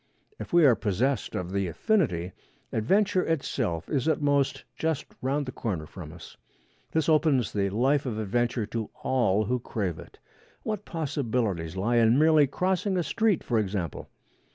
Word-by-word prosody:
If -, -, -7 dB
we 170 Hz, -2 st, +6 dB
are 130 Hz, -, +7 dB
possessed 115 Hz, +4 st, -1 dB
of 90 Hz, 0 st, -3 dB
the 100 Hz, -1 st, 0 dB
affinity, 90 Hz, -, 0 dB, 0.4 s
adventure 190 Hz, -, +2 dB
itself 125 Hz, -, -1 dB
is, 140 Hz, -1 st, -1 dB
at 160 Hz, -, +2 dB
most, 140 Hz, -2 st, +1 dB
just 160 Hz, -3 st, -1 dB, 0.2 s
round 140 Hz, +3 st, 0 dB
the 130 Hz, -, -5 dB
corner 95 Hz, -11 st, -3 dB
from 80 Hz, -1 st, -9 dB
us. 85 Hz, -1 st, -12 dB, 0.5 s
This 160 Hz, -2 st, +1 dB
opens 155 Hz, -7 st, +3 dB
the 100 Hz, -1 st, +1 dB
life 130 Hz, +7 st, +1 dB
of 110 Hz, -4 st, -3 dB
adventure 115 Hz, +2 st, 0 dB
to 110 Hz, 0 st, -4 dB
all 110 Hz, -5 st, +2 dB
who 125 Hz, +4 st, 0 dB
crave 100 Hz, -8 st, -3 dB
it. -, -, -13 dB, 0.5 s
What 215 Hz, -3 st, -3 dB
possibilities 120 Hz, -, -2 dB
lie 115 Hz, +6 st, +1 dB
in 115 Hz, +1 st, +5 dB
merely 155 Hz, -1 st, +5 dB
crossing 185 Hz, +5 st, 0 dB
a 175 Hz, -, +1 dB
street, 215 Hz, -1 st, +1 dB
for 115 Hz, -3 st, +1 dB
example! 95 Hz, -6 st, -3 dB
125 Hz, 160 wpm, -27 LUFS, 100-150 Hz, 0.5 s, are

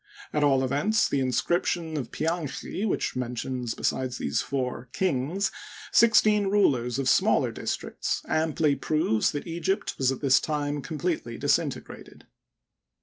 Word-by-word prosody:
At 150 Hz, -, +1 dB
all 135 Hz, -2 st, +3 dB
events, 170 Hz, +12 st, +2 dB
the 140 Hz, -, 0 dB
inscription 160 Hz, +5 st, 0 dB
of 130 Hz, -6 st, -3 dB
Pianchi, 165 Hz, +5 st, -2 dB
which -, -, -1 dB
mentions 125 Hz, -1 st, -3 dB
besides 130 Hz, -1 st, -1 dB
these -, -, -1 dB
four 125 Hz, -2 st, -3 dB
"kings 180 Hz, +4 st, 0 dB, 0.4 s
six 230 Hz, -1 st, +6 dB
teen 210 Hz, -2 st, +3 dB
rulers 135 Hz, -, +2 dB
of 135 Hz, -2 st, -1 dB
smaller 130 Hz, -, +3 dB
districts, -, -, -3 dB
amply 155 Hz, -2 st, +1 dB
proves 135 Hz, -6 st, +1 dB
that 145 Hz, -, -5 dB
Egypt 170 Hz, +3 st, -2 dB
was 135 Hz, -1 st, +3 dB
at 135 Hz, -, -4 dB
this 135 Hz, -2 st, +5 dB
time 145 Hz, -1 st, -2 dB
completely 155 Hz, -6 st, -3 dB
disint -, -, +1 dB
elated. -, -, -13 dB
145 Hz, 140 wpm, -27 LUFS, 130-170 Hz, 0.4 s, six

